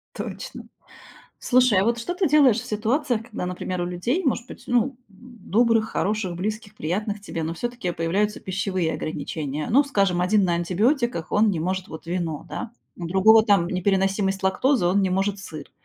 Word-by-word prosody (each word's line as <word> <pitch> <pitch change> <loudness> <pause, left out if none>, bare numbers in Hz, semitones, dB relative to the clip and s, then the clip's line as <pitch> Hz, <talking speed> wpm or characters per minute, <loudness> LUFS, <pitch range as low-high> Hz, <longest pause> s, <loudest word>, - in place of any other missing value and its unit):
Точно. - - -7 0.7
Слушай, 250 -6 +4
а 195 - +2
вот 235 +1 +1
что 350 +10 -3
ты 360 -4 +1
делаешь 275 -6 +5
в 250 - -10
ситуациях, 235 +3 0
когда, 200 -6 -5
например, 180 0 -4
у 175 - 0
людей, 180 - -1
может 245 -3 0
быть, - - -12
ну, 240 -2 +3
м, 270 -2 -7
добрых, 230 +1 0
хороших, 200 -3 -1
близких, 210 +3 -4
приятных 205 +4 -3
тебе, 165 -5 -5
но 160 - -2
всё-таки 240 -2 -3
появляются 195 +6 -1
пищевые 185 -3 -1
ограничения? 150 -1 -4
Ну, 275 +5 +5
скажем, 195 -9 +1
1 200 +2 +3
на 175 -2 +1
антибиотиках, 210 - 0
он 210 +1 +4
не 170 -5 -2
может 185 +2 -2
вот 160 +1 -9
вино, 170 -4 -3
да, 235 - -5 0.3
у 175 - -5
другого 215 +5 +6
там 200 -5 +3
непереносимость 195 +1 0
лактозы, 190 +3 +2
он 195 +3 +3
не 190 - +1
может 195 +2 0
сыр. 155 -6 -9
200 Hz, 180 wpm, -24 LUFS, 180-230 Hz, 0.7 s, другого